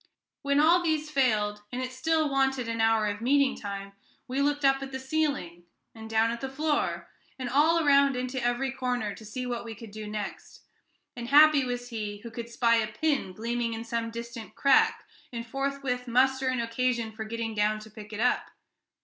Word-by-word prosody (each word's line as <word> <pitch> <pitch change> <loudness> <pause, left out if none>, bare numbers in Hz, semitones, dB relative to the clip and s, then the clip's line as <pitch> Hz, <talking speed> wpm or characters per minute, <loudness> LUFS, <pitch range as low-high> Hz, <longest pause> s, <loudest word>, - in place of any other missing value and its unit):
When 280 0 +2
all 335 +4 +5
these 310 -2 -1
failed, 215 -7 +1
and 250 - -4
it 255 0 -3
still 315 +4 +1
wanted 270 -3 +1
an 230 0 -1
hour 225 -1 +3
of 205 +1 -3
meeting 275 +2 +3
time, 200 -1 -6 0.4
we 265 +2 -1
looked 290 0 +1
up 270 0 +4
at 270 0 -6
the 265 - -4
ceiling, 265 - -2 0.3
and 220 -1 -10
down 225 +1 +2
at 235 - -5
the 270 - -3
floor, 295 +2 -1 0.3
and 255 -2 -4
all 315 +6 +3
around 280 -1 +5
into 255 0 -3
every 245 +2 0
corner, 245 -5 -2
to 220 - -12
see 235 +4 -5
what 240 -1 -3
we 225 -1 -7
could 225 0 -11
do 215 0 -7
next; 210 -1 -6 0.5
and 240 -1 -6
happy 295 +1 +7
was 245 -1 -4
he 210 -3 -4
who 235 +1 -9
could 235 +1 -6
spy 230 0 +3
a 220 -1 +1
pin 280 -2 -1
gleaming 235 +3 -2
in 225 - -5
some 230 -1 -2
distant 235 -1 -8
crack, 445 +11 +4 0.3
and 235 -1 -5
forthwith 270 0 -2
muster 260 +2 +2
an 255 -1 0
occasion 235 0 -1
for 220 0 -6
getting 225 0 -4
down 210 0 +1
to 220 0 -12
pick 210 0 -11
it 210 - -6
up. 250 +2 +1
245 Hz, 200 wpm, -28 LUFS, 225-275 Hz, 0.5 s, happy